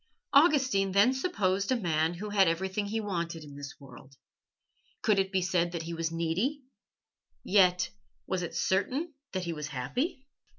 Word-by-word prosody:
Augustine 265 - +4
then 205 +6 +5
supposed 200 - 0
a - - +4
man 165 -6 0
who 210 +4 -6
had 195 -3 +5
everything 190 +5 -1
he 220 +2 -1
wanted 170 -6 -3
in 145 -1 -11
this 140 -1 -8
world. 135 0 -14 0.9
Could 210 -3 +3
it 190 0 0
be 190 -1 +1
said 175 -1 +1
that 165 -1 -3
he 170 +1 -5
was 165 0 -2
needy? 180 - -1 0.8
Yet 180 - +3 0.3
was 185 -1 -1
it 175 - -5
certain 260 - 0 0.2
that 185 -1 -2
he 170 -1 -3
was 150 -2 -5
happy? 250 - -3
190 Hz, 165 wpm, -30 LUFS, 165-210 Hz, 0.9 s, then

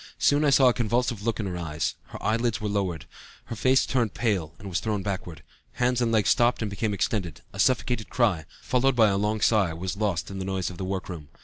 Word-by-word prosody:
Soon 145 +1 +3
I 150 - +4
saw 135 -1 +6
a - - +2
convulsive 120 -1 0
look 115 +1 -1
in 105 - -2
her 90 -2 -3
eyes, 80 -2 -2
her - - -10
eyelids 115 0 +1
were 105 - -3
lowered, 95 -7 -2 0.4
her 115 - -6
face 130 +4 +3
turned 120 -5 0
pale 95 -9 -1
and 100 - -10
was 90 -2 -1
thrown 105 -3 -2
backward; 90 -6 -5 0.3
hands 125 0 +1
and 115 -1 +1
legs 110 -3 +3
stopped 120 -1 +3
and 105 - -3
became 105 +2 -1
extended; 95 -4 -2
a - - -9
suffocated 125 -3 +1
cry, 105 -10 +1 0.2
followed 130 +1 +2
by 110 -3 +5
a 100 - +1
long 105 +1 0
sigh, 100 -7 +3
was 90 +3 -4
lost 100 -5 -1
in 95 - -5
the - - -3
noise 95 -1 -2
of 90 - -11
the 95 - -3
workroom. 90 -5 -5
105 Hz, 230 wpm, -26 LUFS, 95-120 Hz, 0.4 s, saw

